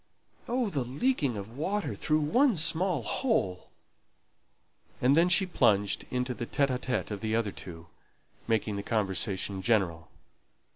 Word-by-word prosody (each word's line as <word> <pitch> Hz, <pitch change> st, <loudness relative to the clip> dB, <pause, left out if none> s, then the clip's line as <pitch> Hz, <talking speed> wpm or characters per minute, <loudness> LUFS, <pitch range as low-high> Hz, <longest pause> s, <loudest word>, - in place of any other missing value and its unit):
Oh, 245 Hz, -2 st, 0 dB
the 140 Hz, -6 st, -1 dB
leaking 140 Hz, -, 0 dB
of 100 Hz, +4 st, -8 dB
water 195 Hz, +8 st, -2 dB
through 155 Hz, 0 st, 0 dB
one 235 Hz, -, +3 dB
small 160 Hz, -2 st, +2 dB
hole!" 105 Hz, -, -1 dB, 1.3 s
And 130 Hz, +3 st, +4 dB
then 170 Hz, +3 st, +4 dB
she 190 Hz, +2 st, +4 dB
plunged 105 Hz, -, +1 dB
into 125 Hz, 0 st, -1 dB
the 120 Hz, -1 st, -6 dB
talk 130 Hz, -4 st, -1 dB
of 100 Hz, -2 st, -4 dB
the 110 Hz, 0 st, -1 dB
other 115 Hz, -3 st, 0 dB
two, 85 Hz, -3 st, -10 dB, 0.6 s
making 110 Hz, -2 st, 0 dB
the -, -, -2 dB
conversation 100 Hz, -2 st, -1 dB
general. 90 Hz, -7 st, 0 dB
125 Hz, 135 wpm, -29 LUFS, 100-165 Hz, 1.3 s, And